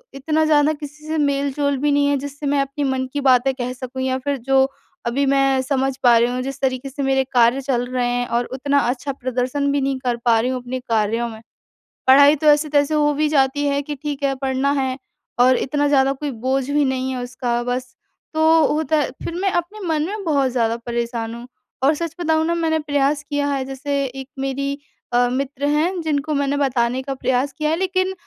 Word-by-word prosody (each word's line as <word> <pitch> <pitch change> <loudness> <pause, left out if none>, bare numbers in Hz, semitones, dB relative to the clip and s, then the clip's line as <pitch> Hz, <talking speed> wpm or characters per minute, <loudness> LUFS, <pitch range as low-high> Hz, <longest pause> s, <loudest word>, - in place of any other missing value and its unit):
इतना 305 +3 0
ज़्यादा 300 0 +3
किसी 300 +1 -10
से 315 +1 -1
मेल-जोल 280 -1 0
भी 290 +2 +1
नहीं 285 0 +3
है 285 0 +2
जिससे 285 +1 -7
मैं 285 0 +1
अपनी 275 +1 -3
मन 265 -1 0
की 290 - -1
बातें 265 0 +4
कह 250 -1 -4
सकूँ, 255 +1 -6
या 260 0 0
फिर 280 +1 -2
जो 265 +2 +2 0.4
अभी 255 +4 0
मैं 270 -1 +3
समझ 265 0 -1
पा 240 -2 +6
रही 235 +1 +3
हूँ, 250 +1 -2
जिस 270 +1 -5
तरीक़े 260 0 -1
से 280 +1 -4
मेरे 270 0 +2
कार्य 245 +2 +4
चल 255 -2 -1
रहे 250 -1 0
हैं, 245 0 0
और 240 +1 0
उतना 280 +3 0
अच्छा 255 +2 -2
प्रदर्शन 255 +2 -1
भी 285 0 +1
नहीं 270 0 0
कर 245 -2 -1
पा 230 -2 +4
रही 240 +3 0
हूँ 255 -1 -3
अपने 250 +1 -5
कार्यों 230 -1 0
में। 220 -1 -10 0.7
पढ़ाई 285 +3 +7
तो 305 +1 -1
ऐसे-तैसे 295 0 +3
हो 295 -1 +3
भी 305 +1 +1
जाती 285 -1 +2
है 280 0 +1
कि 295 +1 -5
ठीक 290 0 -5
है, 275 -1 +2
पढ़ना 265 +1 0
है, 260 -1 -1 0.4
और 255 +1 +5
इतना 290 +1 0
ज़्यादा 275 -1 +3
कोई 285 +1 -4
बोझ 265 +1 0
भी 290 +1 +2
नहीं 260 0 -1
है 255 -1 -3
उसका। 245 -1 -2
बस, 250 +1 -4 0.4
तो 315 0 +4
होता 315 +1 +1
है 295 - +1
फिर - - -4
मैं 390 -1 +1
अपने 350 +5 -2
मन 310 -2 +1
में 415 +1 -5
बहुत 280 -6 +1
ज़्यादा 230 -2 0
परेशान 235 -1 -3
हूँ। 235 +1 -9 0.4
और 280 +3 +5
सच 330 +1 -4
बताऊँ 320 -2 +1
ना, 335 - +1
मैंने 325 -1 0
प्रयास 290 0 0
किया 290 -1 0
है, 270 -1 -1
जैसे 275 +1 -2
एक 265 0 -7
मेरी 275 +1 -2 0.4
अ, 245 0 +4
मित्र 275 +1 -2
हैं 335 +5 +1
जिनको 305 -1 -1
मैंने 285 0 0
बताने 255 -2 +1
का 275 - -3
प्रयास 260 +1 0
किया 305 -1 0
है। 320 - +2
लेकिन 370 0 0
275 Hz, 215 wpm, -21 LUFS, 255-290 Hz, 0.7 s, पढ़ाई